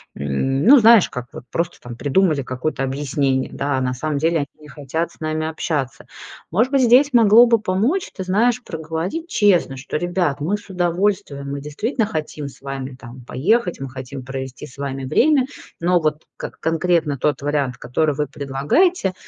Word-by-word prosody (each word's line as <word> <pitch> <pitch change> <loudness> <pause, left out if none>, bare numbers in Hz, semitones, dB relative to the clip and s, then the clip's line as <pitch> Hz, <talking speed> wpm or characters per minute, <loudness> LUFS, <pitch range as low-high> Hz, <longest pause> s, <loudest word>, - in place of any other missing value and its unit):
м, 130 - -1
ну, 275 +6 +9
знаешь, 225 -3 +6
как 125 0 -6
вот - - -9
просто 170 +1 -2
там 120 -1 -8
придумали 150 +3 +2
какое-то 130 +2 -3
объяснение, 135 -1 -1
да, 140 -1 -1
а 130 - -1
на 125 0 -1
самом 150 +3 -2
деле 165 +3 +1
они 145 - -2
не 150 - -14
хотят 150 +4 -4
с - - -23
нами 155 0 -2
общаться. 145 -5 -3 0.5
Может 230 - +2
быть, 270 - +4
здесь 260 +4 +5
могло 230 0 +7
бы 230 -2 +4
помочь, 215 - 0
ты 190 - -5
знаешь, 230 +6 +2
проговорить 165 - -4
честно: 200 - +3 0.2
"Ребят, 175 -4 0
мы 190 +8 0
с 205 - -17
удовольствием, 175 -5 -1
мы 140 0 -4
действительно 215 - -2
хотим 155 -7 -4
с - - -17
вами 135 -1 -6
там 120 +2 -11
поехать, 180 - 0
мы 135 -1 -5
хотим 130 0 -8
провести 130 -1 -6
с 130 - -17
вами 135 -1 -4
время. 270 - +3 0.3
Но 175 +1 +2
вот 155 0 -1
к - - -6
конкретно 165 -2 +1
тот 150 +3 0
вариант, 140 -4 -1
который 145 +6 0
вы 150 +1 -1
предлагаете, 145 - +1
155 Hz, 175 wpm, -20 LUFS, 135-190 Hz, 0.5 s, ну